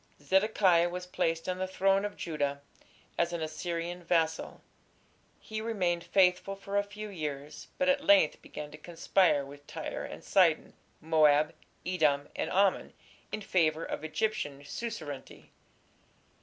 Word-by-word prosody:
Zedekiah 185 +1 +3
was 180 +1 -5
placed 165 -2 -1
on 185 0 -2
the 185 - -1
throne 195 +1 +2
of 205 - -5
Judah 145 -3 -2 0.6
as 170 0 +1
an 170 -2 -2
Assyrian 170 +2 -4
vassal. 165 -2 0 0.8
He 215 0 -5
remained 180 -7 0
faithful 190 +1 +3
for 195 0 -7
a 200 - +4
few 210 +1 -8
years, 150 -5 -6
but 275 - +1
at 280 +1 +3
length 300 -1 +5
began 150 0 -8
to 150 - -11
conspire 170 -2 +2
with 145 +1 -13
Tyre - - -5
and - - -8
Sidon, - - +3 0.3
Moab, 155 -1 +4 0.3
Edom, 150 -6 +1
and - - -2
Ammon 195 0 +2 0.4
in - - -3
favour 165 -5 +1
of - - -5
Egyptian 155 -4 -2
suzerainty. 155 - -7
175 Hz, 140 wpm, -30 LUFS, 155-195 Hz, 0.8 s, length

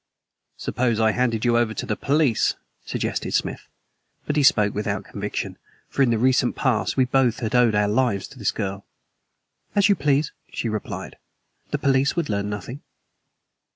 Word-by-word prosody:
"Suppose 120 -3 0
I 110 0 +4
handed 120 -1 0
you 120 -1 +4
over 110 -2 0
to - - -3
the 105 - -1
police?" 140 -3 +2 0.3
suggested - - -2
Smith. - - -2 0.6
But 145 - -1
he 150 - +3
spoke 105 -6 +4
without 105 -1 -2
conviction, - - -5 0.3
for - - -1
in 130 - +5
the 115 - +2
recent 125 +1 +2
past 125 -3 0
we 130 - +4
both 125 -2 +2
had 110 -1 -2
owed 120 -3 +4
our 105 0 +3
lives 105 -3 +1
to 135 - -14
this 105 - +1
girl. 100 -1 -3 0.9
"As 200 0 +4
you 200 - +5
please," 145 -1 +1 0.2
she 115 - -2
replied. 110 -1 -5 0.5
"The - - -1
police 135 0 +2
would 170 -3 -1
learn 100 -1 -1
nothing." 105 +7 -6
120 Hz, 170 wpm, -23 LUFS, 105-135 Hz, 0.9 s, in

